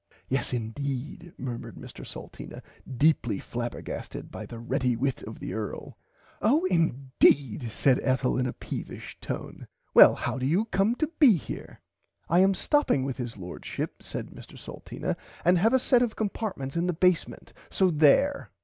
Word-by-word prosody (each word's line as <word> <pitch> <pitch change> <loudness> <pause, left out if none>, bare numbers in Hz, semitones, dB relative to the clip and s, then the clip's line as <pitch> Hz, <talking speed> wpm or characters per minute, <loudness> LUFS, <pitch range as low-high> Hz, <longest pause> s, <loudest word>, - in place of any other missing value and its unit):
Yes 130 -2 0
indeed 135 +7 -4
murmered 125 -2 -6
Mr - - -10
Salteena - - -9 0.3
deeply 140 -7 +3
flabbergasted 120 +3 -6
by - - -7
the 115 - -8
ready 125 +1 0
wit 130 +2 -1
of 110 - -8
the - - -6
earl. 110 -2 -5 0.5
Oh 290 - +3
indeed 135 - +2
said 130 +3 +2
Ethel 130 -1 +1
in 125 0 +1
a - - -3
peevish - - -7
tone - - -6 0.3
well - - +9
how 130 - -3
do 130 - 0
you 180 +9 +2
come 215 +1 +1
to 310 +4 0
be 270 -7 +8
here. - - -8 0.5
I 170 - +4
am 195 +1 +5
stopping 290 - +2
with 135 -1 -3
his 120 -4 -5
Lordship 90 -2 -6
said - - -6
Mr - - -13
Salteena - - -5 0.3
and 175 +1 +5
have 225 +7 +3
a 260 - +5
set 250 -1 +3
of 240 -3 0
compartments 200 -10 -3
in 170 +1 +1
the 180 - +1
basement 180 +1 0 0.2
so 190 -2 +2
there. 160 - +4
140 Hz, 160 wpm, -27 LUFS, 125-190 Hz, 0.5 s, well